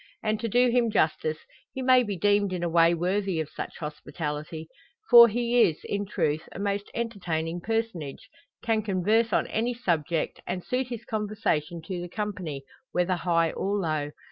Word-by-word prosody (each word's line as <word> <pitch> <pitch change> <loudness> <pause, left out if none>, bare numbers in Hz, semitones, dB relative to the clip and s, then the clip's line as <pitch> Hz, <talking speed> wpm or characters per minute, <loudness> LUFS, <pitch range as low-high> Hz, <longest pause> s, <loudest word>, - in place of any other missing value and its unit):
And, 215 -1 0
to 230 - -2
do 245 +3 +4
him 240 -1 +3
justice, 155 -5 +1 0.3
he 265 - -5
may 255 0 +6
be 205 -5 -3
deemed 205 +1 +2
in 175 -1 -3
a 170 - 0
way 165 0 +4
worthy 185 +1 0
of 155 -2 -3
such - - -7
hospitality; 155 +1 -5 0.4
for 235 -1 +11
he 240 +2 +2
is, 165 -8 +3
in 205 0 -3
truth, 155 -5 -1
a - - -8
most 200 0 -2
entertaining 175 -7 -2
personage; 225 -6 -3 0.4
can 225 -2 +1
converse 215 +3 +1
on - - +2
any 235 +2 -1
subject, 165 -7 -1
and 180 -1 -3
suit 250 0 -1
his 235 -2 -7
conversation 200 -7 -2
to 175 +1 -4
the 175 - -6
company, 185 -9 -4 0.3
whether 180 +1 +1
high 165 -2 +1
or 200 +2 -1
low. 155 -6 -1
195 Hz, 170 wpm, -27 LUFS, 165-225 Hz, 0.4 s, for